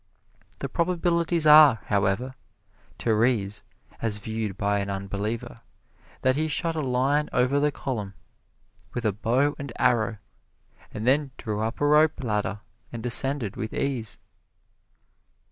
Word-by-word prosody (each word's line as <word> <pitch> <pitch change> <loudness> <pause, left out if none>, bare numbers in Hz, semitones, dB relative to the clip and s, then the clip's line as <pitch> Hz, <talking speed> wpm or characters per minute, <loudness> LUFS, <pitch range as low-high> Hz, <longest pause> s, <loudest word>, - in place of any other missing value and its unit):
The - - -4
probabilities 170 -1 +1
are, 150 -6 +8
however, 100 +5 0 0.6
Terese, 110 -3 +1 0.4
as 110 -2 +1
viewed 110 -1 -4
by 100 0 0
an 100 0 -3
unbeliever, 100 +5 -4 0.7
that 130 0 +3
he 155 +2 0
shot 165 +2 -1
a 155 - -1
line 135 +3 +1
over 130 +3 +2
the 150 +1 +2
column 105 -9 -5 0.8
with 120 -2 -3
a 110 - +3
bow 125 +8 +1
and 140 -3 -6
arrow 115 -3 +1 0.7
and 110 - -5
then 140 +3 +2
drew 105 -1 -4
up 115 +2 -3
a 145 - +1
rope 150 0 +3
ladder 105 -2 -2 0.3
and 120 0 -7
ascended 125 -3 +1
with 110 -1 -5
ease. 125 -7 -2
120 Hz, 130 wpm, -25 LUFS, 105-145 Hz, 0.8 s, are